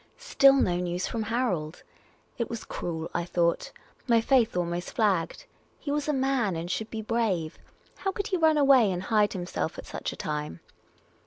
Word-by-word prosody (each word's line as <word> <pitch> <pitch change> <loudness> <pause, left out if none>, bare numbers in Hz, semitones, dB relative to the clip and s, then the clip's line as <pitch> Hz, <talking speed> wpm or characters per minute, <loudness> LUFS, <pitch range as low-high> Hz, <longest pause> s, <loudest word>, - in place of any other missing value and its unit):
Still 275 - +5
no 180 -10 +2
news 180 0 -2
from 230 - -3
Harold! 215 -9 -2 0.6
It 235 - -1
was 230 -1 -6
cruel, 165 -2 -5
I 175 - -1
thought. 170 -1 0 0.4
My 235 -2 +5
faith 230 -4 +2
almost 175 0 -2
flagged. 205 - 0 0.3
He 285 - -5
was 295 0 -1
a - - +2
man 265 - +1
and 170 +2 -4
should 220 +3 -3
be 220 -1 -5
brave. 210 -8 -1 0.4
How 390 - -1
could 405 +1 -4
he 370 - 0
run 320 -2 +4
away 270 -6 +5
snd 180 -1 -2
hide 210 0 +2
himself 180 -2 -3
at - - -8
such - - -5
a - - -8
time 150 - -4
215 Hz, 180 wpm, -27 LUFS, 175-260 Hz, 0.6 s, Still